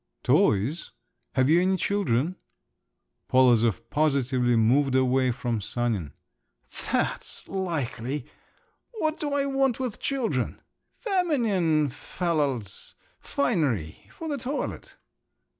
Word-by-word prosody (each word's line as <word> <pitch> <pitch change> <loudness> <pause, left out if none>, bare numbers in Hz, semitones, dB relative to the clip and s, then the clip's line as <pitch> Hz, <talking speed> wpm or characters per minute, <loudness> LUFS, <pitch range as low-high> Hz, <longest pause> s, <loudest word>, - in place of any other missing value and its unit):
"Toys? 115 - +2 0.4
have 130 0 +3
you 165 +4 +5
any 190 +1 +2
children?" 180 - 0 0.9
Polozov 120 -4 +4
positively 130 -5 +2
moved 130 +5 +3
away 130 0 +3
from 120 -2 -2
Sanin. 105 - -2 0.8
"That's - - -1
likely! 145 -8 -3 0.7
What 315 -8 -1
do 295 -2 -2
I 280 -1 +1
want 270 -3 +1
with 250 -5 -3
children? 270 -4 -1 0.4
Feminine 230 - +1
fallals… 145 - -3 0.2
finery. 135 - -1
For 325 - -7
the 290 -3 -2
toilet." 265 +5 -4
145 Hz, 95 wpm, -26 LUFS, 120-205 Hz, 0.9 s, you